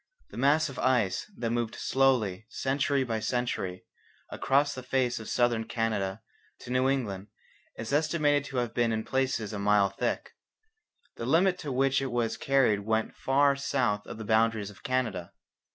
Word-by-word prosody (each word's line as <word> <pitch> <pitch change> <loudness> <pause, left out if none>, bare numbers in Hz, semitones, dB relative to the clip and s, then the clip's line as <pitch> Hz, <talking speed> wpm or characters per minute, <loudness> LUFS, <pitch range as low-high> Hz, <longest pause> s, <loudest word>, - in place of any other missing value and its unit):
The - - -10
mass 145 +5 +3
of 135 - -8
ice 125 - +1
that 115 -2 -2
moved 120 0 -1
slowly, 115 -7 +1
century 135 +2 0
by 115 -3 -2
century, 110 -6 -2 0.5
across 140 +2 +2
the 130 - -6
face 130 -2 0
of 110 - -8
Southern 120 -2 +1
Canada 110 -4 -2 0.4
to 120 - -8
New 130 +1 +2
England 105 -8 -2 0.5
is 110 +4 -5
estimated 150 -1 +2
to 135 - -6
have 120 -2 -1
been 120 -1 +1
in 110 0 -1
places 130 -5 -1
a 105 - -4
mile 100 -1 +3
thick. 100 - -2 0.9
The 115 - -4
limit 180 +5 +3
to 145 - -5
which 135 +1 +2
it 135 -2 -3
was 120 -2 0
carried 135 -7 +2
went 110 +2 -1
far 140 +1 +3
south 125 -7 -1
of - - -7
the 110 - -7
boundaries 110 -1 +1
of 95 - -17
Canada. 110 -9 -2
120 Hz, 170 wpm, -28 LUFS, 110-135 Hz, 0.9 s, mass